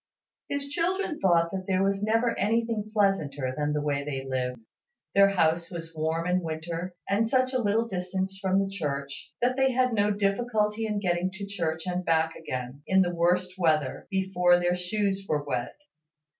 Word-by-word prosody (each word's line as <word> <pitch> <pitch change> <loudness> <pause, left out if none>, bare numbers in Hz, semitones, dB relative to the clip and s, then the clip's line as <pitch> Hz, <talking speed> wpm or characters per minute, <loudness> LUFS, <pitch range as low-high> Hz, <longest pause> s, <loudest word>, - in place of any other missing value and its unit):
His 285 0 -1
children 355 +2 -1
thought 170 -3 +3
that 190 -1 -4
there 190 0 +2
was 195 0 +1
never 225 +2 +2
anything 225 +1 0
pleasanter 150 -11 +1
than 150 +1 -1
the 150 0 -1
way 140 -1 0
they 135 -2 -4
lived. 125 -2 -2 0.5
Their 200 0 +6
house 170 -3 +1
was 165 -2 -7
warm 160 +1 -1
in 180 +1 +1
winter, 165 +2 -4
and 215 +3 +2
such 255 +2 +2
a 255 - +1
little 225 +2 +1
distance 190 0 -3
from 190 -1 +2
the 195 0 +2
church, 140 -6 -4
that 250 +1 +2
they 265 -1 +3
had 255 -1 +2
no 205 -1 +2
difficulty 210 +1 0
in 210 -1 -1
getting 175 -1 +1
to 200 +1 -6
church 165 -5 -3
and 180 0 -2
back 160 -1 +1
again, 130 -2 -5
in 190 0 +5
the 175 -1 -2
worst 180 +2 +1
weather, 155 -5 +1
before 190 -2 +3
their 175 0 +1
shoes 195 +2 -1
were 150 -1 +1
wet. 125 -4 -3
185 Hz, 180 wpm, -27 LUFS, 160-210 Hz, 0.5 s, Their